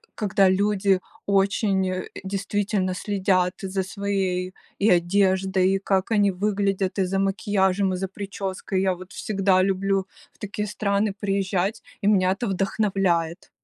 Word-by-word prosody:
когда 195 -3 +3
люди 195 -1 +2 0.3
очень, 195 -1 +2
э, 185 0 -4
действительно 195 -1 -1
следят 190 -2 +1
за 190 -1 -2
своей 190 -2 -2 0.3
и 205 - +3
одеждой, 190 +1 +2
и 195 - 0
как 195 0 0
они 205 -2 +3
выглядят, 195 0 -1
и 190 - +2
за 195 +1 -1
макияжем, 195 -1 +1
и - - -2
за 190 +1 -2
прической. 195 -1 -4
Я 190 -1 +1
вот 185 +1 -12
всегда 195 -2 +1
люблю 195 0 0 0.3
в - - -31
такие 210 +1 -4
страны 200 0 0
приезжать, 195 0 -1 0.2
и 200 - 0
меня 185 -3 +4
это 225 +5 -2
вдохновляет. 195 -3 0
195 Hz, 140 wpm, -24 LUFS, 185-200 Hz, 0.3 s, меня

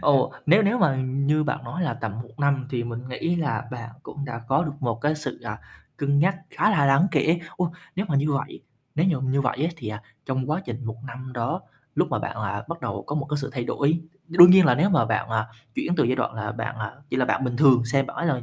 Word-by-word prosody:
Ồ, 140 -3 +3
nếu 190 +8 +6
nếu 220 +5 +2
mà 145 -8 +3
như 140 +4 +1
bạn - - -2
nói 180 - -4
là 155 - 0
tầm 110 -3 -4
1 120 +5 -18
năm 140 -2 +1
thì 120 -2 -1
mình 120 +2 -6
nghĩ 165 +7 -1
là 145 -5 -1
bạn 120 -2 -7
cũng 145 -1 -7
đã 120 -2 -5
có 135 +6 +3
được 150 - -3
một 115 -2 -2
cái 150 +4 +1
sự, 150 - -5
à, - - -5 0.4
cân 140 0 +1
nhắc 185 +5 +3
khá 210 - +2
là 145 -8 +3
đáng 140 +7 +5
kể. 160 +3 +2 0.2
Ô, 175 -2 -1 0.2
nếu 200 +3 -1
mà 150 - +1
như 145 +1 +2
vậy 140 - -3 0.3
nếu 160 -3 +2
mà 130 - -1
như 140 +1 +2
vậy 130 - 0
á 165 - +2
thì, 120 -8 -6
à, 105 0 -6 0.2
trong 130 +1 -2
quá 165 +5 0
trình 120 +1 -6
1 115 0 -4
năm 130 0 -8
đó, 120 -2 -2 0.3
lúc - - +2
mà - - +1
bạn - - -4
là 100 0 -3
bắt 170 0 -5
đầu - - -4
có 145 - -3
một 140 -2 -1
cái 150 - +1
sự 135 - -4
thay 125 -3 -3
đổi, 150 +7 +1 0.3
đương 175 +1 +9
nhiên 185 0 +8
là 125 - +5
nếu 180 +9 +2
mà 170 -11 +4
bạn, 110 0 -1
à, 110 -1 0 0.3
chuyển 175 - -1
từ - - +4
giai 125 +2 +1
đoạn 125 - -1
là 110 0 -3
bạn, 115 0 -4
à, 105 -2 -4 0.2
chỉ - - -1
là 130 - +3
bạn 135 - 0
bình 125 -1 -1
thường 130 -4 +6
xem 135 +3 +1
bạn - - -8
ấy 155 -7 0
135 Hz, 265 wpm, -25 LUFS, 120-155 Hz, 0.4 s, đương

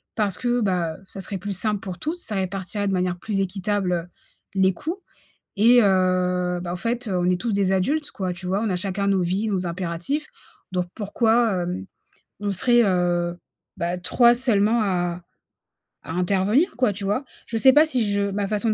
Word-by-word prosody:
Parce 205 -4 0
que, 245 -1 +1
bah, 180 -6 0
ça 195 - -8
serait 195 +1 -4
plus 200 +1 -4
simple 210 -1 0
pour 190 -4 -7
tous, 315 +3 -2
ça 220 - -1
répartirait 195 +2 -2
de - - 0
manière 180 -1 0
plus 205 -2 -2
équitable 185 -2 -1 0.5
les 190 -1 +3
coûts 325 - -4 0.6
et 240 +4 +6
heu, 180 -2 +2
bah, 175 - -5
en 180 - -3
fait, 235 +5 -2
on 180 0 +1
est 180 - 0
tous 230 -2 -1
des 195 -1 +1
adultes, 285 +12 0
quoi, 185 -2 -3
tu 180 +1 -9
vois? 195 +4 0
On 225 - 0
a 180 - 0
chacun 195 +1 -2
nos 195 -2 +2
vies, 190 +5 -1
nos 185 -3 -1
impératifs 180 - -3 0.5
donc 180 -1 -1
pourquoi, 220 -2 +1
hem, 95 - -4 0.5
on 205 - -1
serait, 240 +4 +4
heu, 175 -2 +1 0.4
bah, 175 +1 -1
3 235 +6 +4
seulement 230 -2 +2
à 175 -3 -1 0.8
à 160 - -6
intervenir, 195 - +2
quoi, 245 -5 +2
tu 200 - -6
vois? 210 +8 -1 0.2
Je 225 - -2
sais 265 +3 +6
pas 305 +2 +7
si 255 -6 +1
je 200 0 0
ma 200 0 -1
façon 215 +2 0
de - - +3
195 Hz, 190 wpm, -23 LUFS, 180-225 Hz, 0.8 s, pas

